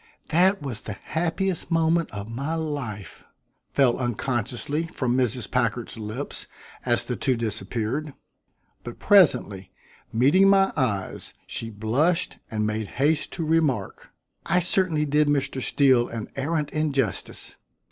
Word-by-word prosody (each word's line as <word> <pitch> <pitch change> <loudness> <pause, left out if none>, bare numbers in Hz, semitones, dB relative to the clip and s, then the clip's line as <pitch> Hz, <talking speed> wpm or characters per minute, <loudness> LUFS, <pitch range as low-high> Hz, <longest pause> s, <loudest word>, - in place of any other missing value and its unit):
"That 180 +2 +3
was 120 -6 -4
the 110 - -6
happiest 175 +3 -1
moment 165 0 +2
of 100 0 -6
my 135 +8 -3
life!" 140 -11 -5 0.5
fell 130 -4 +3
unconsciously 125 +5 -2
from 125 -6 -1
Mrs. 125 -3 0
Packard's 120 -2 -1
lips 110 +6 -4 0.4
as - - +1
the - - -2
two 130 - +1
disappeared; 115 +6 -3 0.7
but 120 - -8
presently, 135 - +3 0.4
meeting 145 +12 +5
my 195 -1 +4
eyes, 105 -9 -2
she 115 - -4
blushed 120 - 0
and 105 -1 -1
made 110 0 -2
haste 150 +3 +1
to 165 - -3
remark: 155 -10 0 0.3
"I 185 - +1
certainly 175 -3 +2
did 150 +1 +2
Mr. 140 -2 0
Steele 130 -3 +3
an 115 -2 -6
arrant 150 +2 -1
injustice. 140 -8 -2
135 Hz, 125 wpm, -25 LUFS, 115-160 Hz, 0.7 s, meeting